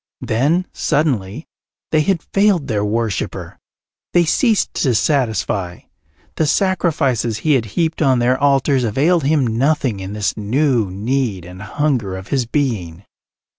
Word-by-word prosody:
Then, 145 +11 +1
suddenly, 130 -3 -1 0.5
they 155 - +3
had 175 +1 0
failed 195 -6 +2
their 105 -6 -1
worshipper; 110 -1 -3 0.5
they 175 -1 +4
ceased 220 - +1
to 125 -4 +2
satisfy; 110 - 0 0.6
the 160 - +1
sacrifices 145 - +1
he 150 +7 +1
had 125 -5 +1
heaped 165 -1 0
on 135 -4 +3
their 120 +1 +2
altars 140 -1 +2
availed 145 +8 +1
him 145 -2 +2
nothing 125 -1 0
in 95 +1 -6
this 105 -1 -1
new 120 0 +1
need 105 -1 -2
and 90 +1 -11
hunger 115 -4 -1
of 95 - -10
his 130 -4 0
being. 105 - -2
130 Hz, 135 wpm, -18 LUFS, 105-155 Hz, 0.6 s, they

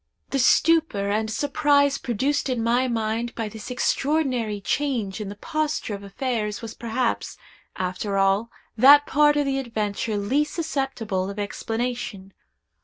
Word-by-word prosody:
"The 275 - 0
stupor 285 -7 +3
and 220 +1 0
surprise 285 +2 +2
produced 265 +5 -1
in 245 -3 -1
my 245 +3 +2
mind 230 0 -2
by 225 -2 -3
this 220 +2 -9
extraordinary 250 -4 0
change 225 -4 -1
in 205 - -5
the 205 - -7
posture 310 +1 -2
of 200 - -6
affairs 210 +1 -3
was 225 -1 -7
perhaps, 235 +1 -2 0.4
after 185 +2 -2
all, 195 +4 +2 0.3
that 285 +5 +8
part 295 +1 +4
of 290 - +2
the 270 0 0
adventure 215 -3 -2
least 270 +9 0
susceptible 265 - -2
of 200 - -7
explanation. 220 -1 -4
235 Hz, 140 wpm, -24 LUFS, 210-275 Hz, 0.4 s, that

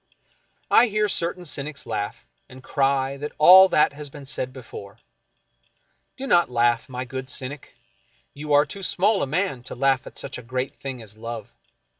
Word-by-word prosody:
I 245 - +7
hear 215 -1 +1
certain 175 -1 -3
cynics 145 -1 -6
laugh, 105 -2 -4 0.2
and 130 0 -13
cry 135 -1 0
that 150 +2 -6
all 185 +5 +9
that 150 - +3
has 145 0 -9
been 140 0 -11
said 130 -1 -3
before. 110 -6 -10 1.2
Do 270 - -5
not 175 - +3
laugh, 120 +1 +1
my 125 0 -4
good 130 +1 -6
cynic. 140 0 -5 0.6
You 150 +1 -7
are 145 +1 +6
too 200 - -9
small 195 +3 +1
a - - 0
man 165 -3 -1
to - - -7
laugh 135 0 +1
at - - -12
such 135 -2 -6
a - - -8
great 130 +2 -3
thing 130 -4 -7
as 105 0 -11
love. 115 -1 -7
135 Hz, 175 wpm, -24 LUFS, 125-155 Hz, 1.2 s, all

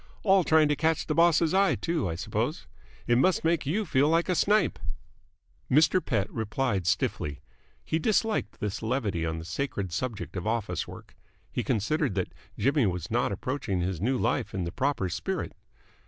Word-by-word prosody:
All 195 -2 +5
trying 155 -1 +4
to 150 - +2
catch 160 +1 +1
the 155 - -1
boss's 165 0 +4
eye, 195 0 +4
too, 165 - -1
I 80 - -3
suppose? 110 - -2 0.4
It 120 0 +3
must 185 +6 +3
make 165 -3 +1
you 205 +8 0
feel 145 -3 +3
like 165 +3 +2
a - - +3
snipe." 205 0 +2 0.9
Mr. 155 +6 +4
Pett 105 -8 0
replied 110 -4 -1
stiffly. 75 -4 -1 0.5
He 160 - 0
disliked 215 - 0
this 105 -1 -3
levity 110 -8 -1
on 80 0 -2
the 80 - -7
sacred 95 0 -3
subject 110 0 -4
of 90 +3 -3
office 110 -2 -1
work. - - -12 0.4
He - - -2
considered 125 - 0
that 95 -2 -2 0.2
Jimmy 140 -3 +2
was 90 -1 -3
not 120 -2 +1
approaching 100 -3 -2
his 90 -1 -2
new 130 +5 +1
life - - -1
in 95 - -1
the 85 - -3
proper 130 -2 0
spirit. 85 - -3
130 Hz, 175 wpm, -28 LUFS, 95-160 Hz, 0.9 s, All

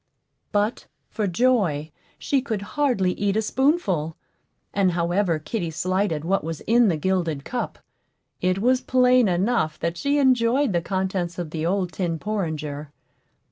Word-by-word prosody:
But, 210 +2 0 0.2
for 215 -3 -1
joy, 180 - +1 0.3
she 275 -2 0
could 220 -6 -3
hardly 250 -11 +2
eat 205 0 0
a - - +3
spoonful; 210 - +1 0.6
and 190 -3 +2
however 175 0 +1
kitty 170 +3 -3
slighted 180 -1 -1
what 195 0 +1
was 165 -1 -5
in 235 +1 +4
the 170 -5 +1
gilded 165 -4 -1
cup, 245 - -3 0.6
it 185 +1 +1
was 250 +5 +2
plain 250 -2 +4
enough 180 -3 +1
that 170 0 -2
she 285 +6 +1
enjoyed 260 -2 +3
the 170 - +1
contents 185 -2 -2
of 170 -3 -4
the 160 0 -2
old 185 -1 0
tin 175 -4 -2
porringer. 155 -7 -3
190 Hz, 145 wpm, -24 LUFS, 170-235 Hz, 0.6 s, in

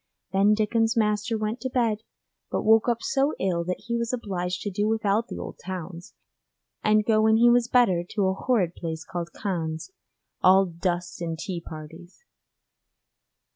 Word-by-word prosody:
Then 200 +2 +4
Dickon's 225 +2 +1
master 210 +1 +1
went 215 +3 -3
to 260 - -2
bed, 230 -4 +1 0.5
but - - -1
woke 220 +2 +5
up 235 -1 -1
so 275 +2 +1
ill 175 -3 0
that 180 +1 -3
he 235 - -3
was 235 0 -1
obliged 185 -7 -3
to 205 - -3
do 205 +3 0
without 220 0 +1
the - - -7
old - - -7
towns, 175 -2 -7 0.7
and 215 0 +3
go 215 -1 +3
when 220 0 +4
he 240 +1 +6
was 240 -1 +3
better 230 -9 +3
to 205 -3 +2
a 190 - +2
horrid 195 -5 0
place 160 -2 -5
called 175 -1 -5
Cannes, 165 - -4 0.5
all 190 +1 +6
dust 175 0 -3
and 165 -1 -3
tea 175 0 -4
parties. 165 - -11
205 Hz, 170 wpm, -26 LUFS, 175-225 Hz, 0.7 s, he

